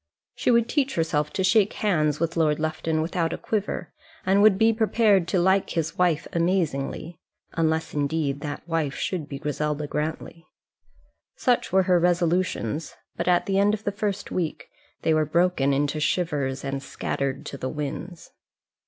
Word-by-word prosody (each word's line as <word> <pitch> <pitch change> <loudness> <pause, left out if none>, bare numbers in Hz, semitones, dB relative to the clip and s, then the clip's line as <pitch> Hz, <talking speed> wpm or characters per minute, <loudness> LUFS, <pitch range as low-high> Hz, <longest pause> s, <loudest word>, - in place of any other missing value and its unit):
She - - -1
would 235 -1 +4
teach 275 +1 0
herself 150 -2 0
to 190 - 0
shake 200 +2 +3
hands 155 -8 +1
with 165 0 -1
Lord 155 -2 +2
Lufton 155 0 -1
without 165 0 -1
a - - -3
quiver, 205 -5 -3 0.3
and 195 +2 +4
would 210 -2 +6
be 225 +2 +4
prepared 215 -4 +3
to 190 - 0
like 190 +2 +3
his 165 -1 -2
wife 175 -4 +1
amazingly 170 -2 -1 0.3
unless 160 0 0
indeed 145 -1 -1
that 145 +2 -6
wife 160 -4 -1
should 170 -6 -3
be 140 - -5
Griselda 150 +1 -2
Grantly. 155 +2 -4 0.9
Such 245 -1 +1
were 190 +1 +4
her 180 -1 +3
resolutions; 170 -5 0 0.2
but 170 - -3
at 175 -1 +3
the 195 0 +1
end 205 +1 +4
of 215 - -12
the 205 - -1
first 205 -1 -3
week 170 -4 -3 0.3
they 160 - +3
were 155 0 +3
broken 160 -2 +2
into 145 +2 0
shivers 145 -5 -1
and 135 0 -3
scattered 135 0 -3
to 140 - -6
the 130 - -3
winds. 155 +4 -6
165 Hz, 165 wpm, -25 LUFS, 150-190 Hz, 0.9 s, would